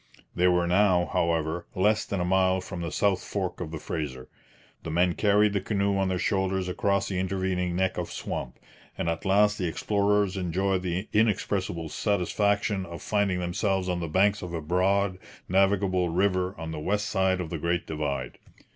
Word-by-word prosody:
They 90 - +3
were 90 -1 +3
now, 90 -1 +3
however, 85 0 0
less 105 +3 +2
than 100 - -3
a 90 - 0
mile 95 0 +3
from 90 -1 -6
the 85 -2 -3
south 100 -3 +1
fork 90 -3 -3
of 85 - -4
the 80 - -5
Fraser; 75 -5 -5 0.5
the - - -6
men 85 +2 +2
carried 105 +2 +3
the 100 - 0
canoe 100 -1 0
on 95 0 +1
their 95 - 0
shoulders 95 0 0
across 100 +2 0
the 95 -2 -2
intervening 95 -1 -1
neck 95 +1 0
of - - -4
swamp, - - -5 0.4
and - - -2
at 85 0 -2
last 105 +2 +3
the 90 - 0
explorers 100 +2 +1
'enjoyed 95 +1 0
the 90 +2 -3
inexpressible 100 -6 0
satisfaction' 100 +1 0
of 85 -3 -8
finding 100 -3 +1
themselves 95 +2 -1
on 90 -1 -1
the 85 - -3
banks 100 +5 +2
of 85 -1 -5
a - - -2
broad, 95 +3 +1 0.3
navigable 95 -1 +2
river, 95 +1 +1
on 80 0 -5
the 80 - -5
west 105 +7 0
side 95 -2 +1
of 85 -3 -4
the 85 - -3
Great 85 +2 -1
Divide. 70 -5 -3
95 Hz, 180 wpm, -27 LUFS, 85-100 Hz, 0.5 s, They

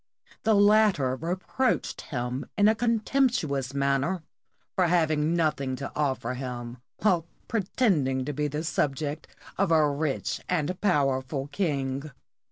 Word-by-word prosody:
The 220 -1 +3
latter 205 -10 +4
reproached 185 - -1
him 125 0 -4
in 205 0 +5
a 220 - +6
contemptuous 230 - +1
manner 140 +6 +1 0.5
for 180 -2 +3
having 160 -2 +2
nothing 145 -5 0
to 140 +1 -6
offer 130 -5 -1
him, 125 -2 -5 0.3
while 175 -6 +3 0.2
pretend 200 - +1
ing 130 -1 -1
to 145 - -3
be 150 +2 -1
the 150 +2 -3
subject 150 -2 -1 0.3
of 195 -2 +3
a 155 -2 +5
rich 145 0 -2
and 180 0 -1
powerful 135 -6 +1
king. 140 -5 -1
150 Hz, 130 wpm, -27 LUFS, 135-185 Hz, 0.5 s, a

